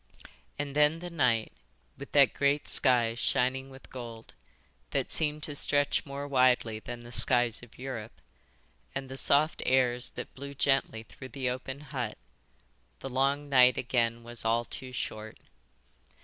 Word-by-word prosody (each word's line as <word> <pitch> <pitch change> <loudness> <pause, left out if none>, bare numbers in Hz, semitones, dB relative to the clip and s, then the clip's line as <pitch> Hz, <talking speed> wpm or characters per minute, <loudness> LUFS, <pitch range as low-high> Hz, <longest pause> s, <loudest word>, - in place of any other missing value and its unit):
And 145 -1 -4
then 150 +2 +4
the 175 +1 -7
night, 120 -8 +1 0.4
with 140 +1 -10
that 140 -3 +6
great, 140 +1 +1
sky 120 -4 +3
shining 130 +2 0
with 135 0 -14
gold, 115 -3 -8 0.6
that - - -1
seemed 150 -1 +1
to 150 - 0
stretch 145 0 +1
more 140 +1 -5
widely 125 -5 +3
than 120 +1 -8
the 120 - -11
skies 120 -2 +2
of 120 -2 -15
Europe, 120 -4 -6 0.8
and 135 -1 -4
the 135 - -6
soft 145 +4 +2
airs 125 -1 +2
that - - -6
blew 140 +1 -8
gently 135 -5 +1
through 130 +3 -11
the 130 -2 -2
open 130 +2 -6
hut, 125 -7 -4 0.8
the 135 - -5
long 140 +3 +1
night 125 -2 +6
again 120 -1 0
was 120 0 -5
all 115 +1 +2
too 130 +2 -7
short. 110 -3 -5
130 Hz, 150 wpm, -30 LUFS, 120-140 Hz, 0.8 s, that